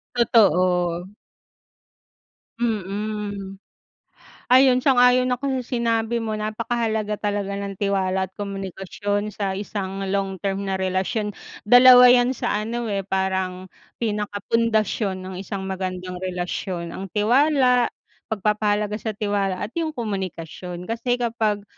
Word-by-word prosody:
Totoo. 180 -6 +3 1.5
Mm. 205 -2 -3 0.9
Ayun, 255 -1 +6
sang-ayon 250 -1 +4
ako 265 +1 -1
sa - - -5
sinabi 230 0 0
mo. 220 -1 -3
Napakahalaga 215 0 -2
talaga 205 -1 -2
ng 200 -1 -5
tiwala 190 -2 0
at 190 - -32
komunikasyon 200 +1 -4
sa 195 -1 -3
isang 195 -1 -4
long-term 195 0 -2
na 190 - 0
relasyon. 190 +3 -1 0.3
Dalawa 250 +2 +9
'yan 250 +1 +4
sa - - -2 0.2
ano, 235 0 -3
eh, 195 -1 -1
parang 190 -1 -1 0.3
pinaka 210 -2 -2
pundasyon 215 -4 +1
ng 185 0 -7
isang 195 0 -5
magandang 185 -1 -4
relasyon. 180 -1 -4
Ang 195 +3 -6
tiwala, 250 +3 +3 0.4
pagpapahalaga 210 0 0
sa 220 -2 -4
tiwala 200 -2 -1
at 210 - -5
yung 315 -2 -2
komunikasyon. 185 -5 -5
Kasi 230 +5 -1
kapag, 225 -4 -1
205 Hz, 115 wpm, -23 LUFS, 190-230 Hz, 1.5 s, Dalawa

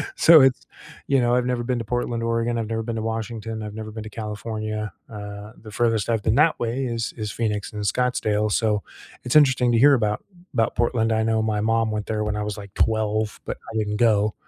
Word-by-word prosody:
So 165 -2 +8
it's, 130 -3 +3 0.4
you 135 - +3
know, 120 0 +2
I've 125 0 +1
never 125 -1 -1
been 125 +1 -1
to 115 - -5
Portland, 120 0 -2
Oregon, 115 +1 0
I've 115 -2 -2
never 115 0 -2
been 115 0 -4
to 110 - -2
Washington, 115 0 -4
I've 105 -1 -7
never 110 0 -6
been 110 +1 -7
to 110 - -8
California, 110 0 -4 0.2
uh, 105 0 -8
the 110 - -11
furthest 115 0 0
I've 110 -3 0
been 110 - +2
that 155 +4 +3
way 120 +3 -1
is 115 -1 -3
is 105 -2 -4
Phoenix 105 -3 -2
and 105 -1 -5
Scottsdale, 110 -2 0
so 105 -1 +1 0.4
it's 125 - -2
interesting 130 -5 +5
to - - +4
hear 140 +5 +7
about 105 -5 0 0.3
about 115 -2 +1
Portland. 115 -1 +1
I 110 - +1
know 110 0 +1
my 110 -1 0
mom 115 0 +1
went 105 -1 -3
there 110 -1 -1
when 105 0 -2
I 105 - -2
was 105 0 -4
like 100 -1 -10
12, 110 -1 0
but - - -4 0.2
I - - -2
didn't 105 -1 -1
go. 105 -3 +3
110 Hz, 230 wpm, -23 LUFS, 105-120 Hz, 0.4 s, So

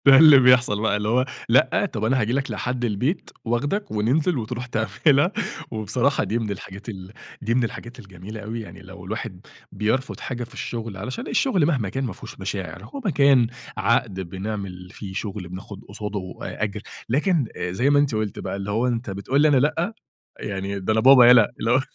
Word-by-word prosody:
ده 135 -1 +9
اللي 150 -2 +9
بيحصل 125 -5 +4
بقى 110 -2 +2
اللي 105 +1 -2
هو 125 +3 +3 0.2
لأ، - - +4
طب 110 - -3
أنا 130 +3 +2
هاجي 110 +2 0
لك 135 0 -1
لحد 125 0 -2
البيت، 120 - -1 0.2
واخدك 145 - -1
وننزل، 135 +10 +1
وتروح 125 +1 -4
تعملها. 125 - +2 0.4
وبصراحة 120 +6 0
دي 115 - -1
من 110 -3 -3
الحاجات 100 +2 -8
ال 95 -3 -8 0.3
دي 115 - 0
من 125 +1 +2
الحاجات 120 +2 -6
الجميلة 100 +1 -9
أوي، 110 +3 -5
يعني 95 -3 -11
لو 95 -1 -12
الواحد 105 -2 -6 0.2
بيرفض 120 +6 -1
حاجة 125 -2 -4
في 120 - -11
الشغل 115 -4 -5
علشان 130 - -5
الشغل 195 - +2
مهما 130 - 0
كان 135 +7 -3
ما 120 -7 -3
فيهوش - - -11
مشاعر، 95 -1 -5
هو 280 - -8
مكان 140 - +4 0.3
عقد 110 -4 +1
بنعمل 95 0 -5
فيه 95 -3 -8
شغل، 100 -2 -5
بناخد 95 +2 -9
قصاده 100 -2 -5
أ - - -4
أجر، 105 -1 -3 0.3
لكن 150 +3 +2
زي 95 +10 0
ما 145 0 +5
أنتِ 145 -5 +1
قلتِ 110 -2 -2
بقى - - -4
اللي 100 +1 -4
هو 115 +4 +1
أنت 120 -1 -2
بتقول 100 +9 0
لي 155 - +6
أنا 145 -3 +4
لأ؟ 160 - +1 0.5
يعني، 100 0 -4
ده 95 +3 0
أنا 110 - +2
بابا 130 0 +8
يالا. 120 -3 +7
اللي 115 - 0
هو 130 - +5
115 Hz, 195 wpm, -23 LUFS, 100-130 Hz, 0.5 s, ده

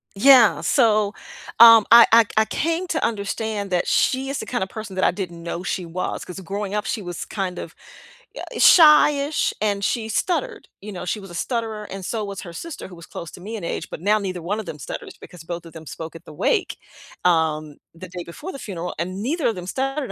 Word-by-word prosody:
Yeah, 245 +1 +6
so, 215 -2 +2 0.5
um, 230 -2 +9
I 235 0 +9
I 230 0 +7
I 220 - +4
came 330 +10 -1
to 320 -2 -2
understand 210 -1 -3
that 180 -1 0
she 265 +1 +1
is 275 - -3
the - - -5
kinda 240 -7 -2
person 210 -1 -8
that 190 - +1
I - - +4
didn't 175 -2 -6
know 170 +1 -5
she 180 -1 -3
was, 170 +2 -4
'cause 180 +1 -8
growing 200 +2 -5
up, 210 0 -1
she 225 - -3
was 175 -2 -6
kind 190 -3 -4
of, 165 - -7 0.6
eh, - - -7
shy-ish 300 -2 +5
and 200 -2 0
she 220 +1 -1
stuttered, 415 - -2
you 210 +2 -8
know, 180 -2 -7
she 195 +4 -2
was 195 - -11
a - - -9
stutterer 220 +1 -3
and 195 -1 -8
so 220 +1 -3
was 200 -1 -6
her 175 - -9
sister 330 - -7
who 180 - -12
was 170 -1 -12
close 170 - -8
to - - -12
me 215 +5 -6
in 210 - -7
age, 170 - -4
but - - -8
now 210 +3 +3
neither 185 -3 -4
one 200 +6 -2
of 220 - -6
them 150 - -8
stutters, 135 - -7
because 175 -2 -13
both 170 0 -6
of 165 - -11
them 160 -1 -11
spoke 160 +2 -8
at 165 - -12
the - - -11
wake, - - 0 0.5
um, 155 -3 +1 0.2
the 170 +2 -11
day 180 0 -7
before 295 - -8
the 275 - -9
funeral, 180 -6 -5
and 185 +3 -4
neither 310 +6 0
of 225 - 0
them 180 -1 -8
stuttered, 270 +5 -2
200 Hz, 230 wpm, -22 LUFS, 175-230 Hz, 0.6 s, um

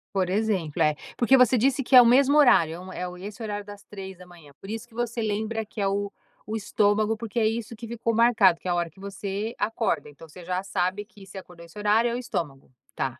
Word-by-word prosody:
Por 185 -2 +1
exemplo, 190 -6 -1
é. 150 -1 +3 0.2
Porque 250 +3 +5
você 250 0 +5
disse 270 +3 +1
que 260 - +2
é 250 - +12
o - - +4
mesmo 270 +4 +5
horário, 170 - +5
é - - -9
um 185 +1 -10
é 180 - -4
o 180 0 -9
e 185 - -10
esse 210 +3 -9
horário 205 -1 -4
das 205 0 -11
03:00, 180 -6 -11
por 195 - -11
isso 225 +2 -6
que 235 - -25
você 235 0 -2
lembra 220 +1 -2
que 215 - -11
é 195 - +1
o 200 +1 -2 0.4
o 215 - -3
estômago, 210 +1 +1
porque 220 0 -8
é 220 - +2
isso 225 +1 -2
que 230 +1 -9
ficou 230 0 -2
marcado, 230 -7 +4
que - - -9
é - - +1
a - - +2
hora 175 -1 -1
que 190 - -22
você 200 +2 -5
acorda, 225 -6 -1
então 150 +3 -14
você 175 +3 -13
já 180 +2 -3
sabe 190 +1 -2
que 205 -2 -17
você 195 - -11
acordou 180 -2 -11
esse 170 +3 -15
horário 210 +3 +2
é 235 - -2
o - - -2
estômago? 155 - -5 0.2
Tá. 130 -2 -3
205 Hz, 255 wpm, -25 LUFS, 180-230 Hz, 0.4 s, é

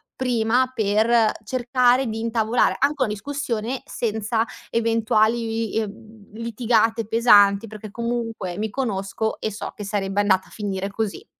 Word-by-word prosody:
prima, 250 0 +1
per 220 +1 +3
cercare 250 +2 +2
di 220 0 -3
intavolare 225 +1 +1
anche 285 +2 +2
una - - 0
discussione 240 +1 -3
senza 220 0 -1 0.2
eventuali, 225 0 +1
uhm, 215 0 -12
litigate 230 -1 +1
pesanti, 205 -3 +5
perché 215 0 -9
comunque 230 -5 -3
mi 220 +1 -1
conosco 215 -2 -2
e 215 - -2
so 205 - -6
che 210 - -7
sarebbe 200 -1 -1
andata 190 -2 +2
a - - -20
finire 195 -2 -3
così. 220 - -3
225 Hz, 130 wpm, -23 LUFS, 210-235 Hz, 0.2 s, pesanti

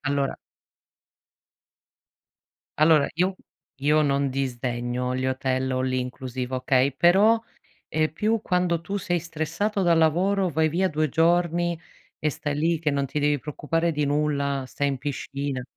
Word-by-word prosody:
Allora 140 -1 -1 2.4
allora 155 -2 +5
io 185 +3 0 0.4
io 150 +2 +3
non 140 -1 +1
disdegno 125 -1 -2
gli 130 - -2
hotel 130 0 -1
all-inclusive, 130 0 -3
okay, 130 +1 +2
però, 200 +9 +5 0.5
ehm, 155 0 0
più 215 +5 0
quando 180 -2 0
tu 200 +3 -3
sei 175 -1 -1
stressato 165 +6 -2
dal 170 -2 +3
lavoro, 180 +4 +2
vai 160 0 +2
via 180 +5 +1
2 155 -1 0
giorni 170 +2 +1 0.4
e 155 - 0
stai 145 0 -3
lì 165 +2 +1
che 150 -1 0
non 140 -1 0
ti 150 - -3
devi 145 0 +2
preoccupare 165 +4 -1
di 150 -1 -1
nulla, 140 -2 0
stai 140 +2 -1
in 135 -2 -2
piscina. 140 -1 -4
150 Hz, 135 wpm, -25 LUFS, 135-170 Hz, 2.4 s, allora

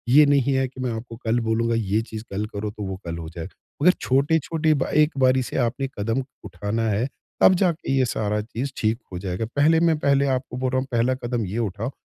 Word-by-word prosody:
ये 150 0 +9
नहीं 140 -1 +3
है 130 0 +2
कि 130 0 -10
मैं 125 -1 -1
आपको 115 +1 -7
कल 115 +2 +2
बोलूँगा 115 0 0
ये 110 -1 +1
चीज़ 110 -1 -7
कल 105 +2 -1
करो, 105 +1 -2
तो 105 0 -7
वो 95 -1 -3
कल 85 -1 -4
हो 80 -1 -6
जाएगा, 85 +3 -8 0.3
अगर 180 +5 +7
छोटे-छोटे 155 +3 +2
ब 135 - +1
एक 150 +1 +4
बारी 130 0 +4
से - - -5
आपने 130 +2 0
कदम 115 +5 0 0.2
उठाना 105 +4 -3
है, 110 +5 0 0.3
तब - - +8
जाके 175 -4 0
ये 130 - +4
सारा 105 -3 -1
चीज़ 120 +5 -4
ठीक 110 +1 +1 0.2
हो 90 - -4
जाएगा। 95 +3 -3
पहले 155 +3 +4
मैं 165 -2 +3
पहले 140 -1 +3
आपको 125 -1 -5
बोल 130 0 0
रहा 130 - +2
हूँ 130 - -4
पहला 120 +2 +2
कदम 120 -3 -2
ये 100 +4 -4
उठाओ, 110 +3 -2
120 Hz, 230 wpm, -24 LUFS, 105-135 Hz, 0.3 s, ये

